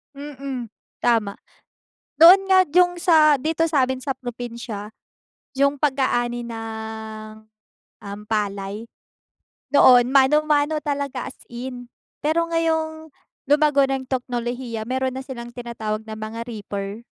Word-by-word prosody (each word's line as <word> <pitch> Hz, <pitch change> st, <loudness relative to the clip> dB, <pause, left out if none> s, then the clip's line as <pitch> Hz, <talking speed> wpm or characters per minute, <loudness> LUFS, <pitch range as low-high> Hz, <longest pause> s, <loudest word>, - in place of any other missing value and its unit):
Mm, 275 Hz, -5 st, -7 dB, 0.3 s
tama. 225 Hz, -4 st, +2 dB, 0.8 s
Doon 385 Hz, +4 st, +8 dB
nga 375 Hz, -1 st, +6 dB
yung 355 Hz, 0 st, +4 dB
sa 315 Hz, -4 st, +5 dB
dito 325 Hz, +4 st, 0 dB
sa'min 260 Hz, -4 st, +1 dB
sa 265 Hz, -1 st, -3 dB
probinsya, 235 Hz, -4 st, -7 dB, 0.6 s
yung 280 Hz, +1 st, +2 dB
pag-aani 240 Hz, -4 st, 0 dB
ng 220 Hz, -1 st, -7 dB, 0.6 s
um, 200 Hz, +1 st, -8 dB
palay. 205 Hz, 0 st, -3 dB, 0.9 s
Noon 250 Hz, -3 st, +6 dB
mano-mano 295 Hz, +2 st, +3 dB
talaga 280 Hz, -3 st, -3 dB
as -, -, -21 dB
in, 245 Hz, 0 st, -7 dB, 0.4 s
pero 315 Hz, +3 st, +2 dB
ngayong 320 Hz, -1 st, -1 dB, 0.4 s
lumago 290 Hz, -1 st, +4 dB
na 270 Hz, -, 0 dB
yung 260 Hz, -, -10 dB
teknolohiya 245 Hz, -2 st, -3 dB
mayro'n 260 Hz, 0 st, -1 dB
na 265 Hz, -, -5 dB
silang 240 Hz, -3 st, -8 dB
tinatawag 220 Hz, -3 st, -4 dB
ng 220 Hz, -, -6 dB
mga 220 Hz, +1 st, -6 dB
reaper. 205 Hz, -1 st, -6 dB
255 Hz, 115 wpm, -22 LUFS, 225-290 Hz, 0.9 s, Doon